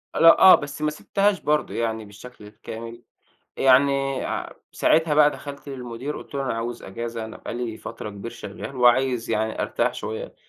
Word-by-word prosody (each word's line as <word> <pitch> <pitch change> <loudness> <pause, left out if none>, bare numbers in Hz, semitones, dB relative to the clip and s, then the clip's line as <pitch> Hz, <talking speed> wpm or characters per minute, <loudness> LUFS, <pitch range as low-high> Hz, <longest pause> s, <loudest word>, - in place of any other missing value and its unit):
لأ، 165 0 +7
آه 190 - +10
بس 145 0 -6
ما 150 0 +1
سِبتهاش 200 +5 0
برضه 150 0 0
يعني 110 -1 -2
بالشكل 105 +2 -13
الكامل، 115 +2 -9 0.6
يعني 135 0 +3
ع - - -4 0.2
ساعتها 160 -1 +2
بقى 150 0 +6
دخَلت 145 -1 -9
للمدير 130 +1 -6
قُلت - - -11
له: 140 - -1
"أنا 130 - -1
عاوز 115 +1 -4
إجازة، 115 +3 -5
أنا 110 - -9
بقى - - -7
لي 120 -2 -4
فترة 105 - -7
كبير 100 +3 -7
شغّال 115 +3 -8
وعايز 125 -1 +3
يعني 110 +1 -1
أرتاح - - 0
شوية 110 0 -6
125 Hz, 170 wpm, -24 LUFS, 115-140 Hz, 0.6 s, آه